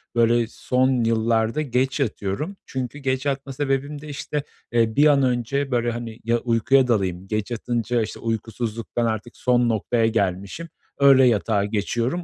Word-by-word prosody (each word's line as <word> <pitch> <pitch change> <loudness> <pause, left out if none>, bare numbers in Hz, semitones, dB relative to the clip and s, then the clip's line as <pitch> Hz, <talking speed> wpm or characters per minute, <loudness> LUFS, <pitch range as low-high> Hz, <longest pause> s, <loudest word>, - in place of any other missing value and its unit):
böyle 115 0 +3
son 125 +1 +1
yıllarda 115 +3 +1
geç 130 0 0
yatıyorum. 125 - -2
Çünkü 130 +2 -5
geç 130 -1 -1
yatma 140 -1 -2
sebebim 140 +1 -2
de, 150 - -10
işte, 145 0 -4 0.3
eee, 115 -2 +2
bir 145 - +5
an 140 -2 +4
önce, 130 +3 0
böyle 120 -1 +1
hani, 115 -1 -6
ya 115 +1 +2
uykuya 125 +3 +3
dalayım; 95 -5 0
geç 110 +2 -2
yatınca 120 +1 -1
işte 110 - -5
uykusuzluktan 115 +1 -3
artık 115 +1 -3
son 125 -1 +2
noktaya 115 +1 +1
gelmişim, 100 - -2 0.3
öyle 135 -2 +7
yatağa 105 -3 +1
geçiyorum. 115 - -1
120 Hz, 150 wpm, -23 LUFS, 110-135 Hz, 0.3 s, öyle